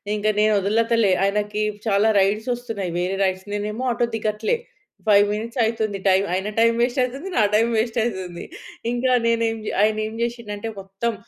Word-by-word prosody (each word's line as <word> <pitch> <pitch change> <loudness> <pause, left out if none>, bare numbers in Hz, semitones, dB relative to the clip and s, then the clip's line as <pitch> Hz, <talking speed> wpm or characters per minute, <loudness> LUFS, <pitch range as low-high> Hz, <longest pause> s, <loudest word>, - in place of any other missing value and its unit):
ఇంక 210 - -5
నేను 215 0 +4
వదలతలే 225 +1 +2
ఆయనకి 210 +1 0 0.3
చాలా 205 +2 +3
రైడ్స్ 210 +5 +1
వస్తున్నాయి 225 -7 -4
వేరే 185 +2 -1
రైడ్స్. 190 +1 -1
నేనేమో 210 +4 -3
ఆటో 240 0 +1
దిగట్లే. 215 - -1 0.5
5 205 -1 +6
మినిట్స్ 230 +4 -4
అయితుంది 220 -3 -1
టైమ్. 190 +1 +4
ఆయన 190 +3 -1
టైం 230 0 +5
వేస్ట్ 245 +2 +1
అయితుంది 275 +9 -4
నా - - +5
టైం 225 +2 +4
వేస్ట్ 225 +1 -1
అయితుంది 185 -6 -4 0.5
ఇంకా 250 +1 0
నేనే 230 0 +2
ఏం 225 - -5
జే - - -3
ఆయన 215 0 +2
ఏం 220 - -8
చేషిండంటే 225 -3 -4
మొత్తం 195 +5 -3
215 Hz, 170 wpm, -22 LUFS, 200-230 Hz, 0.5 s, 5